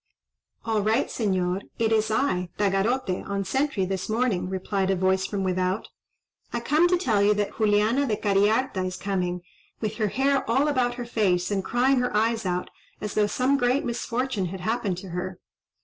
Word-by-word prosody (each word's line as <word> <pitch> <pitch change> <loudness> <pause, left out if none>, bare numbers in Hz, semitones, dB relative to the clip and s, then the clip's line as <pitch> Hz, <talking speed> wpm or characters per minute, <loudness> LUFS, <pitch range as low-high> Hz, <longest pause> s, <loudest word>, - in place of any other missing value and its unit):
"All 220 -2 +1
right 220 +5 +2
Señor! 185 -4 0 0.2
it 225 -1 +1
is 220 0 +2
I, 215 -6 0
Tagarote, 200 +1 +1
on 200 0 -1
sentry 265 0 0
this 190 +1 -3
morning," 215 -6 0
replied 190 +1 -1
a 195 - +3
voice 190 +1 +1
from 200 -2 -2
without. 185 +2 -1 0.6
"I 240 - -1
come 300 +8 +3
to 360 0 +3
tell 225 - +1
you 205 +1 +4
that 205 +2 -2
Juliana 215 +6 +3
de 215 - +1
Cariharta 205 +1 +1
is 185 0 -3
coming, 180 -3 -2 0.4
with 215 -1 -3
her 215 -2 +1
hair 275 +6 +1
all 265 +6 +3
about 250 -4 +1
her 245 -1 -5
face, 195 -6 +1
and 195 -2 0
crying 255 +4 +2
her 245 -4 0
eyes 225 -1 +1
out, 180 0 -2 0.3
as 210 0 -4
though 210 -1 +2
some 260 +6 +1
great 250 +2 +1
misfortune 235 -3 -2
had 185 +1 -7
happened 215 -2 -1
to 185 +1 -8
her." 180 +1 -5
210 Hz, 180 wpm, -25 LUFS, 190-245 Hz, 0.6 s, you